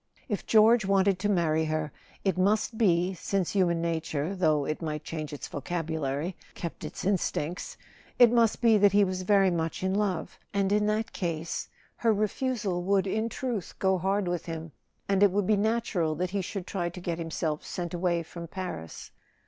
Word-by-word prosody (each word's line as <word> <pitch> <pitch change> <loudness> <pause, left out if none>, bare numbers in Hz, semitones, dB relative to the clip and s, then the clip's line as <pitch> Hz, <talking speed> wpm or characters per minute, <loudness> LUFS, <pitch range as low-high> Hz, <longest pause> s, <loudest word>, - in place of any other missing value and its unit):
If 210 -6 -3
George 225 +1 +6
wanted 195 -1 +3
to 205 +2 0
marry 160 -4 +2
her, 155 -1 -2 0.3
it 195 - +1
must 205 +5 +1
be 185 -4 +2
(since 185 0 -1
human 170 -4 +2
nature, 160 +1 -2
though 155 -6 +2
it 155 - -3
might 155 -2 -3
change 155 -2 -5
its 145 - -6
vocabulary, 160 0 -3 0.2
kept 170 - -6
its - - -6
in¬ 195 -1 +3
stincts), 165 +4 -3 0.4
it 240 -2 +7
must 230 -2 +3
be 225 -3 +5
that 200 -1 +5
he 205 0 +6
was 185 -1 -1
very 195 0 +4
much 165 +1 -2
in 190 0 +1
love— 200 -3 -1 0.2
and 195 -1 +1
in 210 0 +3
that 220 +2 -1
case 165 -2 -3 0.3
her 230 - +3
refusal 210 -2 -1
would 195 +1 +2
in 220 +4 -1
truth 230 -6 -4
go 190 -1 +2
hard 195 +2 0
with 175 -1 -2
him, 165 -1 -5 0.4
and 195 -1 +2
it 205 - +7
would 200 +1 0
be 215 - +3
natural 205 -7 0
that 180 +3 -2
he 200 0 0
should 190 0 -5
try 175 -3 -2
to 175 - -9
get 170 -1 -3
himself 160 -2 -2
sent 175 -1 -5
away 175 -1 0
from 170 +1 -8
Paris. 175 - -6
185 Hz, 190 wpm, -28 LUFS, 165-205 Hz, 0.4 s, it